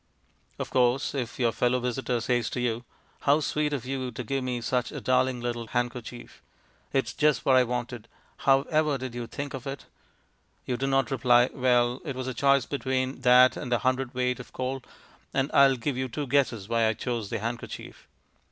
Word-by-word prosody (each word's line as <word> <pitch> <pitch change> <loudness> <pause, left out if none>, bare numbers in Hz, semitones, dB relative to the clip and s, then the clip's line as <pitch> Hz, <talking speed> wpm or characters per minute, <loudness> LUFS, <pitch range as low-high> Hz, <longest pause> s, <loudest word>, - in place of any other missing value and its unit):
Of - - -5
course, 125 +2 +2
if 125 -5 -4
your 120 -3 +2
fellow 125 +2 +1
visitor 125 0 -1
says 120 -1 0
to - - -4
you, 120 -1 -1 0.4
"How 145 +2 +3
sweet 150 0 -1
of 135 -4 -3
you 130 -1 -3
to 125 - -6
give 135 +3 -2
me 125 -1 -2
such 125 +1 -1
a - - -5
darling 130 -1 +1
little 120 -1 -3
handkerchief 120 0 -4 0.5
it's 130 -3 0
just 150 -1 +2
what 130 - +5
I 130 - +6
wanted 120 -1 -4 0.3
how 135 0 +3
ever 155 -2 +1
did 130 -2 -6
you 120 -1 -5
think 140 +3 -6
of 135 0 -6
it?" 135 0 -6 0.8
you 125 - -1
do 135 +2 -2
not 135 0 +1
reply, 120 -1 +4
"Well, 125 -1 +2
it 140 -5 -4
was 130 0 -4
a 130 - -3
choice 140 +1 +3
between 130 -1 -2
that 125 0 +6
and 125 - -6
a 120 - +4
hundredweight 125 +1 0
of - - -11
coal, 130 +1 -3 0.5
and 135 +1 +1
I'll 135 -1 +6
give 125 +2 -3
you 130 0 -1
two 145 +5 -3
guesses 125 -7 +1
why 115 -1 +2
I 110 - +2
chose 115 -2 -3
the - - -2
handkerchief." 115 +3 -6
125 Hz, 195 wpm, -27 LUFS, 120-135 Hz, 0.8 s, I